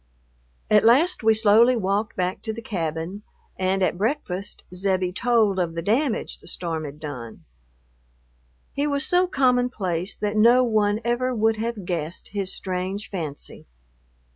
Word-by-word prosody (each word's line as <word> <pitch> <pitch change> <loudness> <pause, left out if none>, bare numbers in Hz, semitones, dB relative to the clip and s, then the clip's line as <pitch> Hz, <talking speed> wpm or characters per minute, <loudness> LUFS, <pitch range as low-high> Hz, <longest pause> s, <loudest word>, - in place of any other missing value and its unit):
At 210 -1 +6
last 290 +11 +4
we 220 -1 +4
slowly 220 +3 +5
walked 205 0 -1
back 185 0 -2
to 220 - -4
the 230 - -7
cabin, 170 0 -4 0.3
and 190 +1 0
at 180 - 0
breakfast 205 -5 -3
Zebbie 185 -1 0
told 220 -3 +2
of 170 -2 -1
the 165 - -3
damage 235 - 0
the - - -16
storm 165 -3 -4
had 145 +1 -9
done. 125 -7 -8 1.3
He 285 +1 0
was 285 0 0
so 360 +1 +3
common 250 -6 +2
place 185 -4 -3
that 210 0 -2
no 240 +4 +6
one 215 -2 +1
ever 245 +1 0
would 220 0 +2
have 225 -3 -4
guessed 170 -1 -4
his 195 -2 -3
strange 190 +3 -3
fancy.... 160 -7 -6
205 Hz, 150 wpm, -24 LUFS, 180-235 Hz, 1.3 s, At